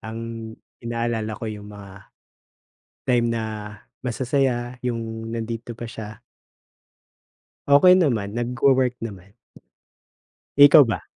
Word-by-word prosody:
ang 110 0 -7 0.6
inaalala 115 -2 -3
ko - - -7
yung 105 -2 -6
mga, 100 -1 -12 1.0
time 120 -2 +2
na 115 -1 -1 0.6
masasaya 125 -1 -1
yung 115 -2 -4
nandito 115 0 -5
pa 120 - -7
siya. 110 -1 -8 1.5
Okey 145 +6 +7
naman, 110 - 0
nagwo-work 125 +2 +1
naman. 100 -1 -10 1.2
Ikaw 145 +1 +9
ba? 110 - -3
115 Hz, 95 wpm, -23 LUFS, 110-125 Hz, 1.5 s, Ikaw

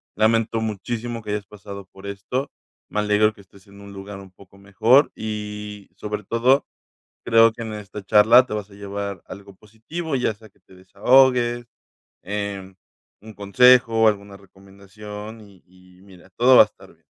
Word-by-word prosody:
Lamento 115 +1 +1
muchísimo 115 +2 -4
que 105 -1 -7
hayas 105 -1 -3
pasado 100 0 -11
por 95 +1 -13
esto. 100 +8 -4 0.4
Me 105 - -2
alegro 105 +1 +2
que 105 - -17
estés 95 0 -21
en 100 0 -16
un 100 - -12
lugar 100 +1 -9
un 95 -1 -14
poco 95 +1 -20
mejor 110 +8 +3
y, 105 -1 -7
sobre 105 0 -6
todo, 125 +6 +2 0.6
creo 115 0 +5
que 115 - -13
en 110 -1 -6
esta 105 -1 -9
charla 110 +5 +6
te 115 - -6
vas 105 -1 -6
a - - -16
llevar 100 -2 -6
algo 100 0 -12
positivo, 115 - -6
ya 125 -3 0
sea 110 +1 -18
que 100 - -34
te - - -21
desahogues, 120 +5 +2 0.6
em, 100 -2 -5 0.5
un 110 +1 -12
consejo, 115 +2 +4
alguna 100 -1 -2
recomendación, 100 +3 -12
y 100 -3 -19
y 90 0 -22
mira, 95 -2 -18
todo 125 +6 +4
va - - +10
a - - -4
estar 105 - -19
bien. - - -34
105 Hz, 170 wpm, -22 LUFS, 100-115 Hz, 0.6 s, va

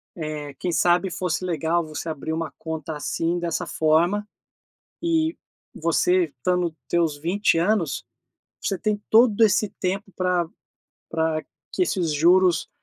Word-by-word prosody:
eh, 155 -3 -5
quem 180 - -1
sabe 175 +3 +3
fosse 180 -1 -2
legal 170 0 0
você 155 +1 -6
abrir 160 +1 -4
uma 165 0 -3
conta 160 -1 -5
assim, 165 +3 -1
dessa 170 -2 -2
forma, 170 +7 +2 0.7
e 325 -1 +1 0.4
você 175 +2 +2
estando 170 +4 -1
teus 165 -4 +1
20 175 +4 +1
anos, 180 -5 +1 0.6
você 195 - -1
tem 210 +1 -1
todo 225 -1 +5
esse 215 -1 +3
tempo 195 +2 -2
pra 180 -2 +1 0.6
pra 160 -1 0 0.3
que - - -2
esses 175 - 0
juros, 175 +3 +4
175 Hz, 130 wpm, -24 LUFS, 160-190 Hz, 0.7 s, todo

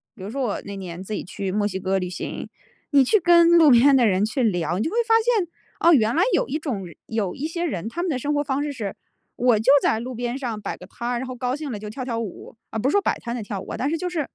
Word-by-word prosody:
比 - - -11
如 205 - -6
说 275 - -3
我 235 -6 -1
那 200 - -7
年 185 -2 -7
自 215 - -6
己 - - -3
去 195 +1 -4
墨 205 +1 +1
西 190 -2 -4
哥 190 +1 0
旅 180 -1 -3
行， 180 - -6 0.4
你 280 -2 +6
去 420 - +3
跟， 340 -1 +6
路 315 - +7
边 270 +4 +6
的 245 -3 +5
人 195 0 +2
去 225 +5 -2
聊， 175 -5 0
你 - - +1
就 - - -1
会 455 - -2
发 450 - +4
现， 445 -6 +2 0.3
哦 340 0 +6
原 230 -1 +3
来 345 - +4
有 - - +2
一 300 - -1
种 235 - -4
人 170 - -13
有 215 -5 -2
一 285 - -4
些 340 +1 -4
人， 205 - -3
他 340 - -4
们 365 - -1
的 275 - 0
生 290 +4 -1
活 290 0 +1
方 275 0 -1
式 295 -1 -3
是， 210 -7 -5 0.4
我 240 -3 +3
就 250 +5 +4
在 220 - +2
路 250 +1 -6
边 240 +1 -3
上 235 -6 -4
摆 - - -4
个 - - -12
摊 235 - -6
儿， 245 -1 -1
然 260 - -5
后 255 - -6
高 250 +1 -2
兴 295 -3 -5
了 215 - -4
就 210 - -7
跳 255 +4 -5
跳 235 -3 -2
舞， 220 0 -7
啊 220 - -3
不 255 +5 +1
是 - - -1
说 405 - +4
摆 - - 0
摊 235 0 -5
的 230 - -4
跳 200 -2 -5
舞 - - -10
啊， - - -4
但 270 - -1
是 325 - 0
就 360 -1 -2
是 335 -3 -1
245 Hz, 335 characters per minute, -23 LUFS, 205-290 Hz, 0.4 s, 路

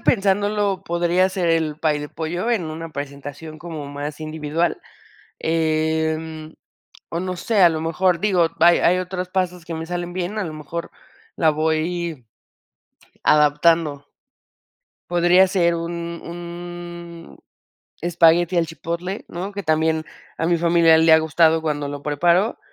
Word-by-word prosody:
pensándolo 205 -1 +1
podría 175 +1 +1
ser 185 -2 -1
el 160 -2 0
pay 155 -2 0
de 150 - -6
pollo 170 +9 -3
en 220 -7 +1
una 160 +1 -6
presentación 145 +2 -7
como 155 -3 -7
más 145 +2 -6
individual, 155 +2 -2 0.6
em, 160 0 -1 0.5
o 165 - -3
no 185 0 -3
sé, 215 +3 0
a 175 - +9
lo 160 -1 -2
mejor, 170 +2 +1
digo, 185 -5 +3
hay 170 +1 +6
hay 180 +1 +3
otros 185 0 -4
pasos 180 -2 -2
que 165 -1 -6
me 160 0 -5
salen 175 0 -4
bien, 185 +4 -3
a 210 - -1
lo 160 - -5
mejor 155 +2 -6 0.5
la 160 -2 +4
voy 160 -1 -1 1.0
adaptando. 150 -1 +3 1.0
Podría 175 +2 +5
ser 170 -3 +2
un 170 +1 -3 0.4
un 175 0 -9 0.6
espagueti 170 +1 +3
al 170 -1 +2
chipotle, 170 +4 -5
¿no?, 185 +3 -5
que 200 0 -6
también 160 0 +1 0.3
a 165 - 0
mi 170 0 +3
familia 170 -1 +5
le 160 0 +5
ha 160 - +8
gustado 160 +1 +3
cuando 145 -2 -2
lo 145 0 -6
preparo 170 +8 +2
165 Hz, 145 wpm, -21 LUFS, 155-175 Hz, 1.0 s, a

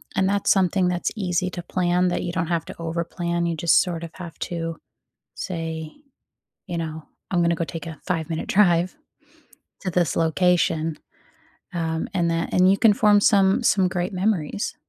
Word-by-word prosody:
And 190 0 +2
that's 200 0 +2
something 190 -1 +3
that's 175 -1 -1
easy 185 -3 -1
to 175 - -6
plan 180 0 +1
that - - -2
you - - -3
don't 170 -1 -1
have 165 -1 -1
to 185 - -8
overplan, 170 +1 -2
you 165 - -1
just 165 +1 +4
sort 170 -3 -3
of 165 - -7
have 175 -3 -9
to 165 -2 -4 0.6
say, 160 -3 -4 0.8
you 175 - -4
know, 160 -1 -5 0.3
"I'm 175 -2 +2
gonna 170 0 +3
go 165 - -2
take 165 +3 -7
a 160 -3 -8
5 165 -3 -1
minute 160 - -3
drive 180 -1 +3 0.8
to 185 - -3
this 175 -5 +1
location," 165 -1 +1 0.8
um, 160 -1 -2
and 175 -3 +1
that 165 0 -2
and 185 +1 +5
you 195 - +3
can 220 0 +5
form 205 0 +4
some 195 +1 +4
some 190 -4 +3
great 180 +1 -2
memories. 195 - -1
175 Hz, 175 wpm, -23 LUFS, 165-185 Hz, 0.8 s, and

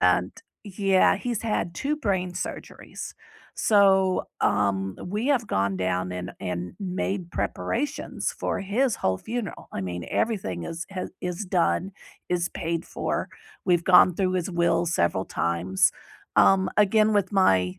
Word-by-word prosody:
And, 90 +1 +3 0.3
yeah, 195 -1 +3
he's 240 -3 -3
had 195 -6 -1
2 290 - -1
brain 190 -9 -1
surgeries, 180 - -6 0.5
so, 190 -3 +4
um, 95 -1 +1
we 210 +7 -2
have 240 -7 +2
gone 95 0 0
down 90 0 -1
and 90 0 -5
and 90 -1 -4
made 185 -1 -3
preparations 285 +5 -2
for - - -1
his 220 +5 +1
whole 95 0 0
funeral, 230 -3 -5
I - - -3
mean, 90 -2 -4
everything 140 - -1
is 170 +1 -5 0.4
h 180 +2 -4
done, 185 +1 +1 0.4
is 175 -1 0
paid 165 0 -3
for, - - -3 0.4
we've 175 -2 +2
gone 180 -1 +7
through 185 0 0
his 185 0 -1
will 170 0 +2
several 125 - +1
times, 85 +3 +1 0.5
um, 190 -1 +5
again, 215 +1 +4
with 200 -2 +1
my 95 - +3
180 Hz, 140 wpm, -26 LUFS, -, 0.5 s, gone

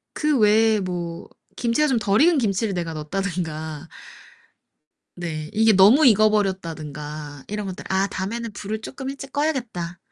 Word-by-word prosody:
그 300 -2 +1
외에 215 +1 +4
뭐 175 -3 -5 0.3
김치가 240 +6 +1
좀 260 -5 +1
덜 205 +2 +2
익은 335 +1 +5
김치를 215 -3 0
내가 170 -2 -3
넣었다든가 160 -2 -4 1.3
네. 155 -3 -5
이게 220 +1 +4
너무 210 +10 +6
익어버렸다든가 160 - 0
이런 210 -1 -4
것들. 185 - -7
'아 190 +1 +1
다음에는 225 +5 -4
불을 210 +2 -5
쪼끔 265 +3 -6
일찍 275 0 -8
꺼야겠다.' 245 - -2
200 Hz, 310 characters per minute, -23 LUFS, 170-230 Hz, 1.3 s, 너무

